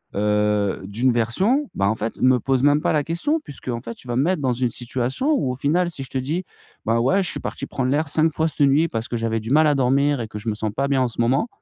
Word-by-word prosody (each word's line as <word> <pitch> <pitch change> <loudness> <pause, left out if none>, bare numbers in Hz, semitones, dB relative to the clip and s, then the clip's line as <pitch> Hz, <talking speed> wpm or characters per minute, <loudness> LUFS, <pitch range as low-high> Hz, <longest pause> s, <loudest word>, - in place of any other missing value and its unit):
heu, 105 -1 +1
d'une 120 +6 +1
version, 190 - +1
bah, 100 0 +1
en 110 - 0
fait, 110 +1 -4
me 130 -1 +4
pose 130 +2 0
même 145 +1 +4
pas - - +1
la 150 -2 +2
question, 170 - -1
puisqu'en 130 - -6
fait 115 0 -7
tu - - -17
vas 120 - -2
me 135 - +3
mettre 180 0 0
dans 130 -2 +1
une 125 0 0
situation 130 - -2
où, 260 - +1
au - - -4
final, 165 +7 +1
si 145 -5 -7
je 130 - -9
te - - -3
dis: 150 +8 -2 0.4
«Ben 115 +1 +2
ouais, 190 +12 +2
je 180 - -3
suis - - -4
parti - - -5
prendre 130 -1 -2
l'air 150 +1 0
5 160 +2 +2
fois 160 +2 +1
cette 145 -2 +2
nuit 150 +5 +3
parce 115 -2 -3
que - - -4
j'avais 115 0 -1
du 110 +3 -6
mal 155 +2 +5
à 150 - +3
dormir 140 +2 +2
et 115 - -4
que 105 - -7
je 110 +2 -4
me 105 - -1
sens 110 0 -2
pas 140 +1 0
bien 135 -2 +2
en 130 - +2
ce 120 0 -4
moment, 130 - +2
130 Hz, 290 wpm, -22 LUFS, 115-155 Hz, 0.4 s, mal